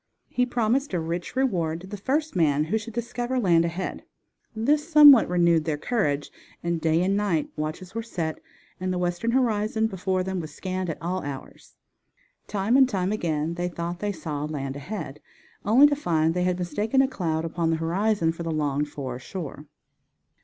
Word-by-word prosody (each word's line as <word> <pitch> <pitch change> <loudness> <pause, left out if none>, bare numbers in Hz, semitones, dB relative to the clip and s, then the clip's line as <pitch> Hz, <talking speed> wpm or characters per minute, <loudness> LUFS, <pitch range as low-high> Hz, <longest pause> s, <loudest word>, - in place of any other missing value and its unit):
He 250 0 +1
promised 245 0 0
a - - +1
rich 165 +5 -4
reward 170 -11 0
to - - -10
the 200 +2 -7
first 290 +9 -1
man 150 -4 +3
who 190 +8 0
should 220 +1 -9
discover 240 +2 -2
land 170 -8 +4
ahead. 170 +3 -4 0.5
This 295 +8 +1
somewhat 290 - +9
renewed 170 -3 +3
their 155 -2 -1
courage, 150 -7 -1 0.3
and 170 -1 -1
day 165 +1 +2
and 195 +2 +1
night 200 -7 0
watches 155 +5 -5
were 230 - -2
set 170 -8 -4 0.4
and 185 0 -2
the 180 - -1
western 175 +5 -1
horizon 220 -3 +1
before 190 -2 -1
them 190 0 -3
was 155 -3 -6
scanned 185 -1 -3
at 160 - -4
all 185 +2 -2
hours. 140 -2 -8 0.7
Time 205 +5 +1
and 265 -1 +5 0.2
again 160 -5 -1
they 175 +1 -2
thought 170 0 -4
they 205 +1 -1
saw 155 -5 -4
land 140 -3 -4
ahead, 150 -1 -6 0.5
only 235 +8 +7
to 290 0 +4
find 165 - +1
they 180 +1 0
had 180 -1 +1
mistaken 210 +9 +1
a - - +2
cloud 165 -10 -2
upon 165 0 -1
the 165 - +2
horizon 170 +2 +1
for 165 - -8
the 165 - -3
longed 150 -2 -1
for 130 -4 -5
shore. 150 0 -7
180 Hz, 180 wpm, -25 LUFS, 160-220 Hz, 0.7 s, somewhat